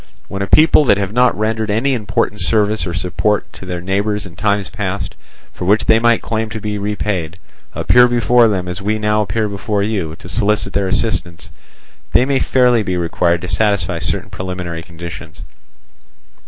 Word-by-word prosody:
when 95 - -5
a 100 - -1
people 155 +3 +5
that 100 -8 +4
have 100 0 -3
not 125 +1 +3
rendered 110 0 -1
any 115 +7 +1
important 105 -2 -1
service 105 -2 +1
or 85 - -3
support 100 +3 0
to 95 - -11
their 90 -1 -4
neighbours 100 +3 -1
in 85 -3 -11
times 100 0 0
past, 100 -2 -4 0.4
for - - -6
which 105 +4 +3
they 110 - +4
might 120 0 +2
claim 110 0 -2
to 110 +1 -5
be 105 0 -3
repaid, 100 -4 -3 0.4
appear 125 0 +5
before 120 0 +4
them 95 -4 -1
as 90 +2 -5
we 105 +2 0
now 105 0 +1
appear 105 +2 -1
before 100 0 -2
you 95 -7 -2
to 90 - -13
solicit 100 +2 0
their 100 -1 0
assistance, 90 -5 -2 0.6
they 125 - +5
may 135 -1 +1
fairly 125 -3 +3
be 95 -3 -2
required 85 0 0
to 90 - -5
satisfy 90 -3 0
certain 75 - -3
preliminary 90 -3 -5
conditions. 85 +1 -9
100 Hz, 180 wpm, -17 LUFS, 90-110 Hz, 0.6 s, people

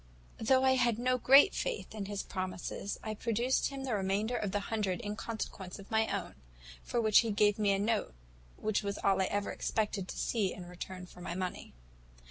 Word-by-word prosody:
"Though 260 +4 +4
I 265 - +5
had 240 -3 +2
no 255 +1 +1
great 275 +9 +7
faith 485 - -3
in 210 -2 -4
his 205 -1 -3
promises, 185 +1 -4
I 215 - -3
produced 235 +4 +1
him 275 -1 -6
the 260 -3 -2
remainder 205 +4 0
of 210 -4 -1
the 205 +1 0
hundred 200 -3 -1
in 205 -2 -4
consequence 205 -4 -5
of 200 - -13
my 220 0 +3
own; - - -3 0.5
for 240 - -2
which 215 -3 +6
he 230 - +1
gave 210 0 +3
me 205 -1 +3
a 195 - +2
note, 210 - 0 0.4
which 215 -1 0
was 200 -1 -3
all 195 -1 +2
I - - +3
ever 205 +2 -1
expected 210 -3 -1
to - - -7
see 205 -6 0
in 180 - -8
return 180 +1 -7
for 180 - -14
my 175 - -4
money. 185 -1 -4
210 Hz, 205 wpm, -32 LUFS, 195-230 Hz, 0.5 s, great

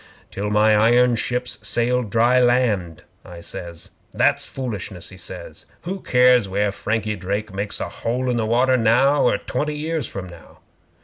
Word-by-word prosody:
'"Till 105 +1 -3
my 105 +1 +4
iron 120 +3 +4
ships 125 +1 -3
sailed 120 +1 0
dry 120 +4 +3
land," 120 -10 +1 0.2
I 90 -1 -11
says. 85 0 -8 0.2
'"That's - - +2
foolishness," 105 -8 -6
he 95 - -12
says. 85 -3 -9
"Who 190 +3 -5
cares 125 - +4
where 100 +1 0
Frankie 110 +1 -2
Drake 100 +2 -4
makes 100 +1 -3
a - - -3
hole 125 +3 -3
in 125 -1 0
the 110 -1 -1
water 130 +3 +3
now 125 +5 +3
or - - +3
twenty 150 0 -3
years 155 -3 -2
from 95 -2 -7
now?" 85 -2 -15
115 Hz, 165 wpm, -21 LUFS, 100-125 Hz, 0.2 s, my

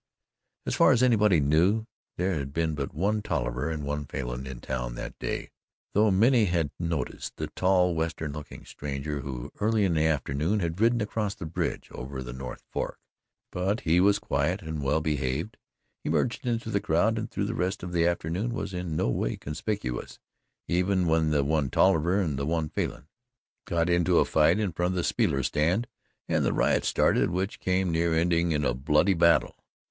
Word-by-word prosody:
As - - -1
far - - +5
as 120 - +2
anybody 105 -8 +4
knew, 85 +10 +3 0.3
there 90 +2 0
had 70 -4 -4
been 80 -1 0
but 70 -2 -3
one 105 +7 0
Tolliver 60 - -2
and 80 -2 -3
one 75 +1 -3
Falin 65 -1 -5
in 65 -2 -7
town - - -4
that - - -7
day, - - -4 0.4
though 105 +1 +4
many 115 +4 +4
had 85 -5 0
noticed 85 -3 -3
the - - -4
tall 90 -1 +3
Western 80 -2 -2
looking 75 -1 -9
stranger 70 +1 -4
who, 65 -3 -6
early 110 -1 +2
in 90 - +1
the 80 0 +2
afternoon, 75 +6 0
had 85 +1 -2
ridden 120 0 +3
across 105 -1 -2
the 90 - -7
bridge 80 - -3
over 65 +1 -6
the - - -7
North 65 0 -7
Fork, - - -3 0.5
but 95 +5 -1
he 85 +2 +3
was 100 +2 +5
quiet 85 +8 -1
and 80 -2 -4
well 70 +3 +1
behaved, 75 +5 -2 0.5
he - - -3
merged 125 +2 0
into 115 -2 -1
the 100 - +1
crowd 105 +5 +2
and 110 - -4
through 100 - -2
the 110 - -2
rest 95 +2 -2
of 90 - -5
the 85 -1 +2
afternoon 85 +7 -1
was 95 - -4
in 90 -3 -3
no - - +1
way - - -1
conspicuous, 75 - -4 0.5
even 90 +1 +1
when 80 -1 +2
the 75 -2 +2
one 75 -1 +1
Tolliver 90 +4 +3
and 75 -8 -1
the 70 - -2
one 80 -1 0
Falin - - -3 0.6
got 85 0 0
into 85 -1 +3
a - - +5
fight 75 +5 +3
in 105 -4 0
front 90 +3 -1
of - - -3
the 90 - 0
speaker's 70 -2 +1
stand 85 +10 +1 0.4
and - - +1
the - - +1
riot - - +2
started - - +2
which 95 +3 -2
came 95 -1 +1
near 80 0 +1
ending 85 0 +2
in 75 -2 0
a 60 - +2
bloody 75 +9 +2
battle. 85 -1 +2
85 Hz, 195 wpm, -27 LUFS, 75-95 Hz, 0.6 s, far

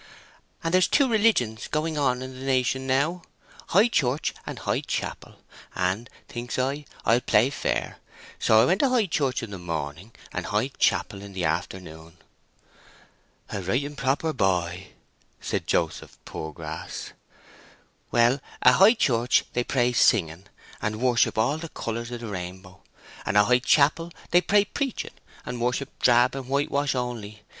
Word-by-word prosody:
"And 165 +1 -1
there's 185 -1 +5
two 280 -2 +3
religions 205 - +2
going 155 +1 -1
on 130 -3 +1
in 130 0 -7
the - - -8
nation 130 0 0
now—High 170 - 0
Church 140 - 0
and - - -5
High - - -1
Chapel. - - -5 0.4
And, 95 +6 -1 0.2
thinks 120 -1 -5
I, 140 +3 -1 0.2
I'll 115 +2 +4
play 130 - +3
fair; - - -2 0.4
so 110 - +5
I - - +6
went 185 +3 +2
to 275 - +3
High 245 -4 +3
Church 140 -8 -1
in 110 - -6
the 95 - -6
morning, 80 +3 -5 0.2
and - - -3
High 105 +5 0
Chapel 100 -6 0
in 100 -1 -10
the 90 -2 -2
afternoon." 80 0 -4 1.3
"A 100 - -3
right 95 +10 0
and 145 +1 -6
proper 140 +4 0
boy," 90 - 0 0.5
said - - -3
Joseph - - -1
Poorgrass. 80 -2 -7 1.0
"Well, 120 +3 +3 0.2
at 125 - +8
High 205 +6 +7
Church 120 - +2
they 125 - +1
pray 125 -1 +1
singing, 90 -6 +2 0.4
and 110 0 -2
worship 120 -3 +2
all 135 +8 +1
the 165 0 -7
colours 115 -2 -4
of 120 -1 -6
the 115 - -6
rainbow; 95 -1 -7 0.4
and 105 - 0
at 105 - +6
High 125 +2 +4
Chapel 150 +5 +3 0.2
they 175 - +6
pray 200 +4 +3
preaching, 275 +4 -3 0.3
and 125 -1 -5
worship 125 +3 -1
drab 120 0 +5
and 135 -2 -6
whitewash 140 0 0
only. 115 -4 -5
125 Hz, 155 wpm, -25 LUFS, 105-145 Hz, 1.3 s, at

